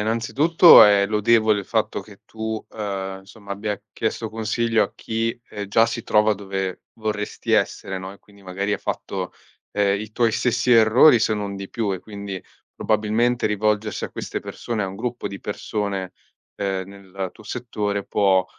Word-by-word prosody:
innanzitutto 135 +10 +6
è 100 -1 +5
lodevole 110 0 +3
il - - -9
fatto - - -1
che - - -16
tu, 110 0 -4
ehm, 95 -3 -5
insomma 100 +1 -10
abbia 105 0 -3
chiesto 110 0 -2
consiglio 115 +1 0
a - - -3
chi, 115 +1 -3
ehm, 105 - -5
già 115 +3 +4
si 115 0 -4
trova 105 0 +3
dove 95 -2 -4
vorresti 105 -2 -3
essere, 95 - 0
no, 95 +1 -7
e 100 - -16
quindi 100 -1 -21
magari 95 +2 -2
ha - - -5
fatto, - - -4 0.4
ehm, 100 -1 +1
i 110 +1 -8
tuoi 115 0 +2
stessi 120 +2 +1
errori 115 +4 +7
se 110 - +2
non 100 -2 -3
di 100 0 -7
più, 110 -4 -1
e 95 - -7
quindi 100 -3 -7 0.3
probabilmente 110 +3 +1
rivolgersi 105 0 0
a - - -6
queste - - -5
persone, 115 -3 -4
a 95 - -2
un 95 - -8
gruppo 120 +2 -4
di 100 - -6
persone, 100 -2 -3 0.4
ehm, 95 -2 -2
nel 95 -1 -7
tuo 110 - -16
settore 105 -4 -3
può, 95 -2 +3
105 Hz, 170 wpm, -22 LUFS, 100-110 Hz, 0.4 s, errori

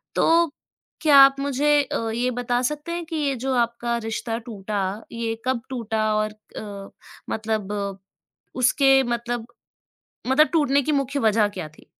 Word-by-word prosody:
तो 335 -1 +3 0.5
क्या 295 -3 +6
आप 275 0 +7
मुझे 280 +1 -1 0.2
अ, 230 -4 -3
ये 245 +2 0
बता 245 0 -1
सकते 300 +5 -3
हैं 345 0 -3
कि 325 0 -6
ये 285 -3 0
जो 265 0 -1
आपका 235 0 0
रिश्ता 225 +1 -3
टूटा 210 -3 -4 0.3
ये 230 -1 -2
कब 260 -2 0
टूटा 225 -4 -2
और 215 0 0 0.3
अ, 200 -2 -7 0.4
मतलब 215 -2 -2 0.8
उसके 270 +1 +4
मतलब 240 -1 -3 1.1
टूटने 285 -3 +3
की 305 - -1
मुख्य 280 0 0
वज़ह 215 -2 +3
क्या 185 -6 -7
थी? 155 - -20
240 Hz, 145 wpm, -23 LUFS, 220-275 Hz, 1.1 s, आप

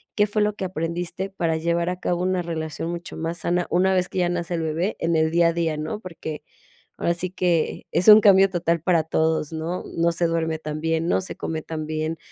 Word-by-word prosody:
¿Qué 210 - +4
fue 210 +1 0
lo 210 0 +1
que 195 - -5
aprendiste 175 +2 -3
para 165 -4 -1
llevar 170 +1 0
a 180 0 -4
cabo 175 -1 -1
una 185 -1 +1
relación 160 -1 -4
mucho 175 0 -7
más 165 +1 -3
sana, 175 +2 0
una 190 +2 +3
vez 180 -1 +1
que - - -3
ya 175 -1 +2
nace 175 0 -2
el 165 - -2
bebé 165 +6 -1
en 165 0 0
el 160 0 +2
día 170 0 +4
a - - -1
día?, 165 -2 0
¿no? 155 +8 -4
Porque 165 -4 -7 0.5
ahora 170 - +1
sí 180 +1 -3
que 175 -4 0
es 180 - +1
un 215 0 +10
cambio 195 -1 +6
total 170 -3 0
para 170 -2 +2
todos, 160 -1 0
¿no? 160 +3 -3
No 170 0 +3
se 170 0 +1
duerme 160 -1 -1
tan 155 -1 -5
bien, 165 0 0
no - - +3
se 185 - -5
come 160 -1 -4
tan 155 -1 -5
bien. 155 +1 -2
170 Hz, 235 wpm, -23 LUFS, 160-180 Hz, 0.5 s, un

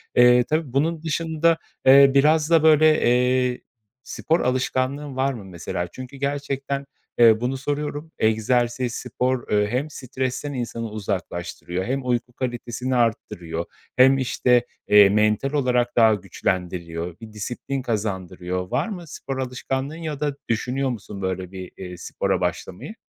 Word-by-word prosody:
Eee, 125 0 +6
tabii, 155 -2 -2
bunun 155 +4 +1
dışında, 165 0 +1 0.3
eee, 135 +1 +8
biraz 150 +3 +4
da, 165 -2 +5
böyle, 155 0 +5
eee, 125 +1 +2 0.4
spor 165 +2 0
alışkanlığın 130 +2 -1
var 135 +1 +1
mı 110 -6 -9
mesela? 90 -1 -4
Çünkü 130 +8 -10
gerçekten, 140 0 -2 0.3
eee, 115 -2 +6
bunu 130 +2 -1
soruyorum. 145 +3 -4
Egzersiz, 120 +2 +1
spor, 125 0 -2
eee, 105 0 +3
hem 125 +7 -2
stresten 130 +1 -4
insanı 115 -2 -4
uzaklaştırıyor 95 -3 -4
hem 135 +1 -2
uyku 125 0 -1
kalitesini 125 0 -3
arttırıyor 85 -8 -1 0.3
hem, 135 +1 +6
işte, 125 -1 +2 0.2
eee, 105 -1 +7
mental 105 +6 +2
olarak 125 -4 +1
daha 115 -2 +6
güçlendiriyor, 90 -3 -3
bir 110 -1 -10
disiplin 120 +5 -4
kazandırıyor. 95 -5 -3
Var 130 +6 0
mı 180 -5 -7
spor 135 -2 -6
alışkanlığın 130 +2 -3
ya 155 -4 -5
da 145 -1 -1
düşünüyor 125 +4 0
musun, 105 -4 -6
böyle, 95 -1 -3
bir, 95 -2 -8
eee, 90 -1 -8
spora - - -2
başlamayı? 95 - -4
125 Hz, 140 wpm, -23 LUFS, 105-140 Hz, 0.4 s, eee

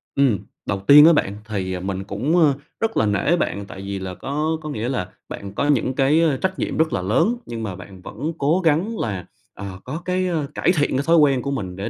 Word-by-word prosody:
ừm, 135 -7 +3 0.3
đầu 95 - -2
tiên 150 +2 +10
á 170 - +7
bạn 105 -9 0
thì, 95 -4 -3
à, 90 - -3
mình 95 +1 -4
cũng, 120 - -1
ơ, 155 -4 +5 0.3
rất 225 0 -1
là 110 - +3
nể 105 - +2
bạn 100 -10 -2
tại 95 0 -10
vì 100 0 -4
là 95 -1 -5
có 150 - -2
có 155 - -6
nghĩa 115 -3 -3
là 125 -9 -2 0.2
bạn 100 -1 -7
có 145 - 0
những 130 -2 +2
cái, 140 +4 +3
ơ, 155 -5 +2
trách 190 +4 -2
nhiệm - - -2
rất 160 0 +2
là - - 0
lớn, 110 - +2
nhưng 115 -1 -5
mà 100 -4 -4
bạn 95 0 -12
vẫn 130 - -5
cố 150 +6 +2
gắng 170 +9 +1
là, 100 -5 -3 0.3
ờ, 100 -2 -8
có 150 +6 -5
cái, 185 0 0
ơ, 160 -5 -1
cải - - +2
thiện 145 - +2
cái 140 - 0
thói 165 0 +4
quen 140 -4 +4
của 140 - -3
mình 95 -10 -4
để 95 +2 -4
135 Hz, 250 wpm, -22 LUFS, 100-155 Hz, 0.3 s, tiên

